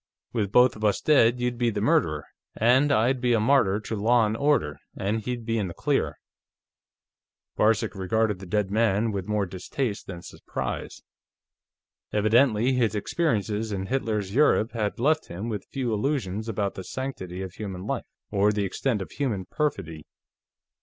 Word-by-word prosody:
"With 105 -5 -1
both 125 +2 +5
of 110 - -9
us 105 -1 +2
dead, 125 -5 +4
you'd 125 -1 -1
be 120 -1 +3
the 105 - -2
murderer, 75 -8 +1 0.3
and 130 +6 +4
I'd 125 +1 +2
be 125 -1 +2
a 115 - +3
martyr 110 -4 +3
to 110 - -4
law 115 +2 +3
and 105 +1 -1
order, 115 - +1 0.2
and 105 +3 -1
he'd 120 0 -4
be 115 0 0
in 100 - -1
the 85 - -8
clear." - - 0 1.4
Varcek 110 0 +2
regarded 105 +1 0
the 95 - -9
dead 105 0 0
man 110 0 +2
with 95 -3 -4
more 105 -1 0
distaste 100 +5 -4
than 90 -2 -7
surprise. - - -6 1.1
Evidently 115 +3 +3
his 115 -4 +1
experiences 110 - -1
in 95 -1 -2
Hitler's 105 -5 -2
Europe 125 -5 +3
had 110 -3 -2
left 155 +5 +2
him 95 +7 -5
with 105 -4 -4
few 125 -4 -1
illusions 110 -3 -1
about 100 -2 -1
the 95 - -7
sanctity 95 -8 -5
of 95 -2 -7
human 95 -2 -6
life - - -3 0.2
or 105 0 +3
the 105 -1 -1
extent 105 +1 -1
of - - -13
human 110 -10 -2
perfidy. 90 - -3
110 Hz, 165 wpm, -26 LUFS, 100-120 Hz, 1.4 s, both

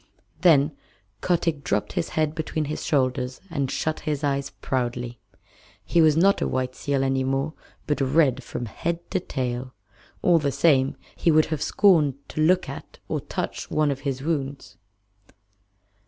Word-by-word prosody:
Then 150 -4 +4 0.5
Kotick 165 -4 0
dropped 105 0 -1
his 85 - -1
head 155 -1 +2
between 155 -1 -2
his 150 +2 -4
shoulders 130 -2 0
and 140 -5 -1
shut 155 0 -1
his 150 -1 -3
eyes 140 -1 0
proudly. 120 -3 -3 0.7
He 170 - +3
was 155 -1 +5
not 195 +4 +4
a - - +1
white 130 -1 -1
seal 140 0 -1
any 135 0 +1
more, 135 +3 -1 0.3
but 150 -2 -1
red 135 -2 +3
from 120 - -5
head 170 +9 -4
to 190 - +1
tail. 125 -5 -4 0.5
All 175 -2 +5
the 145 -2 0
same 135 -3 +3 0.2
he - - +1
would 155 -1 +5
have 150 - -3
scorned 160 -10 +4
to 155 - -3
look 180 +4 +3
at - - -9
or - - -1
touch - - -4
one 155 -1 +2
of 135 - -3
his 135 -1 -3
wounds. 140 -3 -3
140 Hz, 160 wpm, -25 LUFS, 130-155 Hz, 0.7 s, was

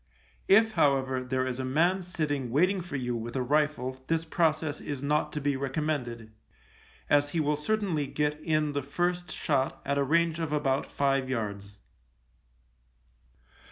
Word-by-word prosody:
If, 220 +3 +6
however, 130 -7 +2
there 130 0 -1
is 130 0 -3
a - - -1
man 170 +9 +2
sitting 150 -7 -2
waiting 180 +9 +2
for 175 -4 -7
you 125 -2 -2
with 115 +2 -5
a 130 - 0
rifle 130 -2 0
this 165 0 0
process 155 -2 0
is 145 -2 -5
not 150 +1 +1
to 150 - -2
be 145 -1 0
recommended, 130 -5 -3 0.8
as 145 0 +3
he 165 - -1
will 150 -1 +2
certainly 165 -2 -1
get 150 +2 -1
in 155 -2 +1
the 145 0 -1
first 175 +6 -2
shot 135 -3 0
at 140 0 0
a - - +3
range 165 +3 +2
of 160 -3 -2
about 140 -3 0
five 135 -2 0
yards. 100 -4 -4
145 Hz, 160 wpm, -28 LUFS, 130-160 Hz, 0.8 s, If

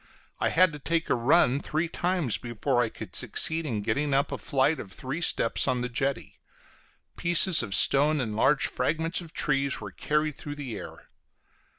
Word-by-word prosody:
I - - +1
had 180 -1 +3
to 150 - -8
take 165 +3 -2
a - - +5
run 135 +2 +3
three 155 +3 -2
times 175 - -1
before 120 +2 -1
I 115 - 0
could - - -10
succeed 160 0 +2
in 110 -6 -3
getting 140 +6 -1
up 140 - 0
a - - -4
flight 140 +2 0
of 95 - -9
three 135 - -6
steps 115 -7 +1
on 125 -2 0
the 125 - -3
jetty; 135 +3 -3 0.8
pieces 175 +1 +4
of 105 -5 -2
stone 150 +2 +4
and 110 -5 -3
large 135 +5 +2
fragments 160 +7 -1
of 165 -2 -11
trees 140 -4 0
were 105 -2 -8
carried 150 +8 -1
through 145 +1 -8
the 135 -6 -6
air. - - -10
140 Hz, 185 wpm, -27 LUFS, 125-160 Hz, 0.8 s, a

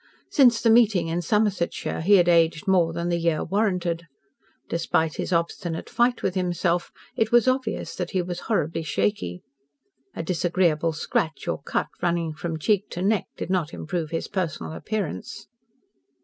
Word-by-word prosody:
Since 245 -5 +5
the 230 - +5
meeting 210 -8 +4
in 170 +2 -1
Somersetshire 200 -3 0
he 200 +5 +5
had 175 -2 +5
aged 165 +1 +3
more 180 -4 +3
than 170 +1 -3
the 170 0 +1
year 165 -2 +1
warranted. 180 -5 -1 0.6
Despite 165 -1 0
his - - -3
obstinate 170 0 -2
fight 240 0 +2
with 185 - 0
himself 175 -1 0 0.2
it 220 -1 +1
was 240 +1 +5
obvious 255 -4 -1
that 180 -1 -3
he 185 -2 0
was 175 0 -5
horribly 165 -6 0
shaky. 100 - -2 0.7
A - - -3
disagreeable 170 -2 +1
scratch 160 +1 -2
or - - -2
cut, - - -2
running 170 -2 0
from 165 +1 -4
cheek 200 +5 +1
to 175 - -4
neck, 210 0 +1
did - - -4
not 175 -4 -1
improve 160 -1 -3
his 165 0 -3
personal 170 -5 -3
appearance. 190 - -4
175 Hz, 160 wpm, -25 LUFS, 165-200 Hz, 0.7 s, Since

